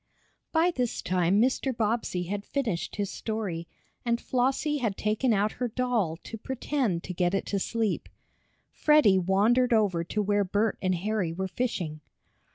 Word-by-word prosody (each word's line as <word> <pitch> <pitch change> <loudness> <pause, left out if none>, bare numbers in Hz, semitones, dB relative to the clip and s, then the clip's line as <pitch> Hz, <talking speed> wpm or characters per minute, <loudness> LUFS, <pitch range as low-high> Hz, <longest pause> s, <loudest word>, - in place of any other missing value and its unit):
By 335 +2 +3
this 250 -7 -2
time 185 +2 +2
Mr. 255 +1 +1
Bobbsey 215 -5 0
had 200 +3 -4
finished 225 -9 -2
his 205 -1 -2
story, 200 -7 -4 0.4
and 235 -1 +1
Flossie 265 +5 0
had 220 -6 -1
taken 215 +4 +1
out 210 0 +2
her 250 - +2
doll 230 -9 0
to 225 - -8
pretend 250 -7 -1
to 180 - -5
get 180 +1 +1
it 195 - -1
to 200 - +2
sleep. 225 +1 -1 0.6
Freddie 300 -11 +5
wandered 220 +7 +3
over 200 -7 +2
to 210 +4 -1
where 205 0 +2
Bert 205 +3 0
and 185 -1 +1
Harry 195 -1 -1
were 190 +3 -3
fishing. 180 -8 -3
210 Hz, 160 wpm, -28 LUFS, 185-245 Hz, 0.6 s, Freddie